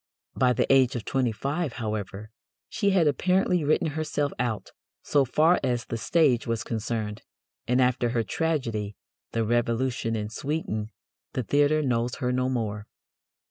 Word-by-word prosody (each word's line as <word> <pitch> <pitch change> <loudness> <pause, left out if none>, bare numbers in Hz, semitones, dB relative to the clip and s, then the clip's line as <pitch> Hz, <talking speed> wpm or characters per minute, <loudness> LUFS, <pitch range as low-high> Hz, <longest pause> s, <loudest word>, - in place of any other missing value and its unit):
By 125 -1 +3
the - - +1
age 130 -2 +4
of 120 - -4
twenty 130 -3 +1
five, 140 +5 -2
however, 110 -2 -4 0.4
she 205 -2 0
had 190 -4 +3
apparently 180 +4 +2
written 155 +2 +2
herself 150 -1 -2
out, 120 -4 -2 0.3
so 140 -2 +3
far 155 +7 +3
as 120 -3 0
the - - -4
stage 130 0 +2
was 115 -1 -1
concerned, 110 -2 -3 0.5
and 125 +2 +2
after 125 -1 +2
her 115 -1 0
tragedy, 115 -5 -2 0.4
The 115 - +1
Revolution 115 0 0
in 105 -1 -3
Sweden, 115 -5 -3 0.4
the 130 - -1
theatre 145 +5 +3
knows 120 -1 0
her 125 -1 -1
no 130 0 +1
more. 105 -4 -3
125 Hz, 150 wpm, -26 LUFS, 115-145 Hz, 0.5 s, age